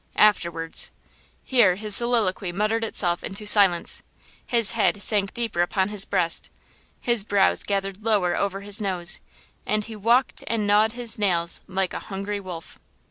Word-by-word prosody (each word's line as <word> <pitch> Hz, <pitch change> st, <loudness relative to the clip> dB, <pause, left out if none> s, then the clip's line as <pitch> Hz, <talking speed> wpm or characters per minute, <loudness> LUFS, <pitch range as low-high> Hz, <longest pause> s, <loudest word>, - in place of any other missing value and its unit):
Afterwards!–" 170 Hz, -6 st, +1 dB, 0.5 s
Here 230 Hz, -9 st, +3 dB
his 210 Hz, +1 st, +1 dB
soliloquy 220 Hz, -6 st, 0 dB
muttered 215 Hz, +5 st, -1 dB
itself 175 Hz, -5 st, 0 dB
into 200 Hz, +2 st, -6 dB
silence, 195 Hz, -5 st, +5 dB, 0.5 s
his 230 Hz, -3 st, +3 dB
head 220 Hz, -2 st, 0 dB
sank 200 Hz, -2 st, +3 dB
deeper 230 Hz, -7 st, -2 dB
upon 190 Hz, +2 st, -1 dB
his 205 Hz, -2 st, -1 dB
breast, 180 Hz, -4 st, 0 dB, 0.5 s
his 235 Hz, -4 st, 0 dB
brows 200 Hz, -2 st, +1 dB
gathered 195 Hz, 0 st, -3 dB
lower 205 Hz, -6 st, 0 dB
over 195 Hz, 0 st, -3 dB
his 205 Hz, +1 st, -1 dB
nose 185 Hz, -2 st, +2 dB, 0.4 s
and 215 Hz, 0 st, -1 dB
he 220 Hz, +1 st, -10 dB
walked 235 Hz, +5 st, 0 dB
and 225 Hz, -2 st, -1 dB
gnawed 210 Hz, +2 st, +2 dB
his 240 Hz, -3 st, -1 dB
nails 170 Hz, -4 st, +1 dB
like 190 Hz, -1 st, -2 dB
a -, -, -4 dB
hungry 200 Hz, +1 st, -4 dB
wolf. 180 Hz, -4 st, -10 dB
205 Hz, 150 wpm, -23 LUFS, 185-215 Hz, 0.5 s, silence